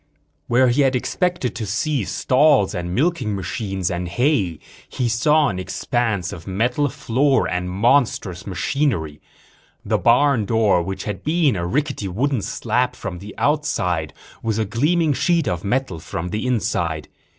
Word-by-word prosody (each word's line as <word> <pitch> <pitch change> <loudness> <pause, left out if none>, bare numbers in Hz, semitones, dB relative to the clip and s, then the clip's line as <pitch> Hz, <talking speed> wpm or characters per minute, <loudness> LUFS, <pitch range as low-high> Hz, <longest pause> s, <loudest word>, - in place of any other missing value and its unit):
Where 125 +1 +4
he 125 +4 +2
had 135 -1 +3
expected 175 +1 -1
to 110 -2 -4
see 125 +3 -1
stalls 135 -4 +3
and 90 0 -3
milking 130 - 0
machines 95 -1 -3
and 90 0 -3
hay 100 - +1 0.3
he 125 - -1
saw 150 +6 +3
an 95 - -4
expanse 100 +1 -1
of 85 -2 -10
metal 120 +9 0
floor 135 0 +1
and 90 0 -2
monstrous 100 -3 +1
machinery. 95 - -1 0.6
The - - +1
barn 125 -1 +3
door 105 -4 +3
which 95 +3 -4
had 105 -3 -5
been 155 -5 +2
a 85 -2 -2
rickety 140 -2 -1
wooden 125 +6 0
slab 125 +5 -1
from 90 -6 -6
the 100 +2 -10
outside 110 - 0 0.3
was 110 -2 -1
a 110 - +1
gleaming 150 - +1
sheet 170 +2 +1
of 85 -1 -2
metal 115 -5 -1
from 90 +1 -5
the 105 +6 -2
inside. 85 -10 -1
115 Hz, 150 wpm, -21 LUFS, 95-140 Hz, 0.6 s, Where